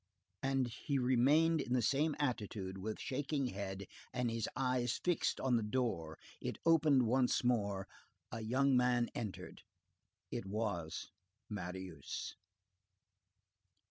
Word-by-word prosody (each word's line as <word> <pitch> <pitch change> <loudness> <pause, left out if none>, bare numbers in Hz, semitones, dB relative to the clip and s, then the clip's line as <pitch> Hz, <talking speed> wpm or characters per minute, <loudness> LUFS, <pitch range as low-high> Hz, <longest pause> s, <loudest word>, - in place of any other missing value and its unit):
And 135 -1 +1
he 140 +5 -2
remained 140 +6 +4
in 125 - -2
the 125 - +3
same 145 +6 +2
attitude, 105 -8 -2
with 105 +3 -4
shaking 140 +1 -1
head, 100 -2 -4 0.3
and 125 -2 0
his 115 -2 -1
eyes 125 -2 +1
fixed 165 -3 +1
on 130 -2 +3
the - - +1
door. 105 -9 -1 0.2
It - - -3
opened 155 -5 +5
once 125 +2 +3
more. 100 -5 +1 0.4
A 115 - -4
young 130 +5 +3
man 125 -1 +3
entered. 110 -5 -5 0.7
It 95 - -3
was 100 -6 -3 0.4
Marius. 95 -3 -5
120 Hz, 120 wpm, -36 LUFS, 100-135 Hz, 0.7 s, opened